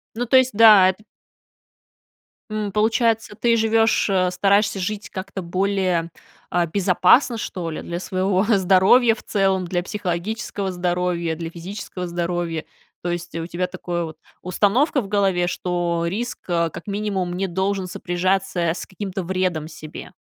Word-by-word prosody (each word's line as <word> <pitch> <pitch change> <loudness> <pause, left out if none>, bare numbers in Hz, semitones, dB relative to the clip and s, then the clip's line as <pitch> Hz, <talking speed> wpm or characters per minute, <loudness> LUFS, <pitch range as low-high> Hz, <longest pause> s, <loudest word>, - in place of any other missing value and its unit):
Ну, 240 +2 -2
то 260 +2 +5
есть, 260 0 +4
да, 210 -3 +8
эт 190 +2 -4 1.5
М, 215 -2 -3
получается, 225 +1 +1
ты 235 +1 +2
живешь, 225 -1 +2
э 185 -2 +2
стараешься 200 +2 +2
жить 210 +2 -4
как-то 190 0 -6
более, 185 -1 0 0.4
а, 175 -1 +1
безопасно, 195 - +3
что 180 -5 -4
ли, 155 - -5
для 170 0 -5
своего 185 +1 0
здоровья 200 +3 +4
в - - -14
целом, 195 -2 +1
для 175 0 -2
психологического 200 +1 -3
здоровья, 175 -2 -1
для 165 0 -5
физического 180 +1 -7
здоровья? 170 -1 -2 0.4
То 175 - -2
есть 175 0 -4
у 165 0 -3
тебя 180 +1 -2
такая 175 -2 -4
вот 160 -1 -7 0.2
установка 220 - +2
в 200 - -8
голове, 190 -3 +1
что 175 -2 -1
риск, 235 +7 -3
э, 170 -1 +1
как - - -9
минимум, 200 -3 -2
не 195 +1 -1
должен 190 +1 -1
сопряжаться 185 +1 -1
с 170 0 -1
каким-то 190 -1 -5
вредом 180 -4 -1
себе. 155 +2 -10
185 Hz, 150 wpm, -22 LUFS, 175-205 Hz, 1.5 s, да